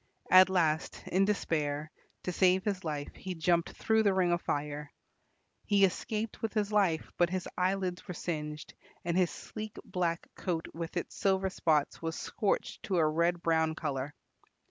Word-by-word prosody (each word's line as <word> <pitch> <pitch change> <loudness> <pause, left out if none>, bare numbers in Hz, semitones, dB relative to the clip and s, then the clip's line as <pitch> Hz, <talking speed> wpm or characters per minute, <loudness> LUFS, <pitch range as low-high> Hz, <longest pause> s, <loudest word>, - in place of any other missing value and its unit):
At 185 0 +9
last, 160 -4 +1
in 190 +2 +2
despair, 155 -7 -1 0.3
to 180 - -2
save 185 +1 +3
his 195 -3 -1
life, 150 -3 -4
he 185 -1 -6
jumped 170 +1 +2
through 220 0 +2
the 200 -3 +3
ring 180 -2 +3
of 175 0 +1
fire. 145 0 -3 0.8
He 200 -2 +5
escaped 215 +3 -3
with 225 -1 -2
his 210 -1 +1
life, 190 -7 +2
but 175 -1 +4
his 185 0 -2
eyelids 185 0 -1
were 180 - -5
singed, 150 -3 -4 0.3
and 170 -1 0
his 180 -2 +3
sleek 215 -1 -7
black 170 -2 -1
coat 170 -3 -2
with 165 +1 -5
its 175 - -3
silver 190 -1 +1
spots 155 -5 +1
was 165 0 -2
scorched 210 -3 -1
to 190 - 0
a 160 -2 +4
red 170 +2 +1
brown 160 -1 +2
colour. 145 -2 -3
175 Hz, 165 wpm, -31 LUFS, 160-190 Hz, 0.8 s, At